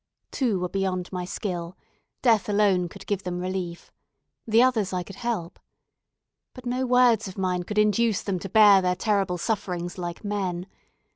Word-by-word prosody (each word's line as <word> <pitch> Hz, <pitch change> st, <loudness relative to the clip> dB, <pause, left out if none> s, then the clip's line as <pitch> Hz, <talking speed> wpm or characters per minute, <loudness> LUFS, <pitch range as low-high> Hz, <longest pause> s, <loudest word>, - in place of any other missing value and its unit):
Two 235 Hz, -8 st, 0 dB
were 180 Hz, -, -1 dB
beyond 185 Hz, -1 st, -2 dB
my 180 Hz, -1 st, -3 dB
skill. 175 Hz, -1 st, -5 dB, 0.5 s
Death 225 Hz, -5 st, +3 dB
alone 200 Hz, -4 st, +2 dB
could -, -, -12 dB
give 200 Hz, -2 st, -1 dB
them 180 Hz, -2 st, -4 dB
relief. 180 Hz, -2 st, -4 dB, 0.6 s
The 225 Hz, +2 st, +5 dB
others 220 Hz, -7 st, +1 dB
I 180 Hz, -1 st, -1 dB
could 195 Hz, +1 st, -11 dB
help. 215 Hz, -8 st, -3 dB, 1.0 s
But 255 Hz, -1 st, -11 dB
no 255 Hz, +1 st, -1 dB
words 245 Hz, -4 st, +4 dB
of 190 Hz, +2 st, -9 dB
mine 185 Hz, -2 st, 0 dB
could 210 Hz, +4 st, -6 dB
induce 210 Hz, 0 st, +2 dB
them 190 Hz, -3 st, -2 dB
to 195 Hz, -, -7 dB
bear 205 Hz, -1 st, +7 dB
their 180 Hz, 0 st, +1 dB
terrible 195 Hz, -2 st, 0 dB
sufferings 180 Hz, -3 st, -3 dB
like 175 Hz, +2 st, -5 dB
men. 190 Hz, -4 st, -2 dB
195 Hz, 165 wpm, -25 LUFS, 180-215 Hz, 1.0 s, bear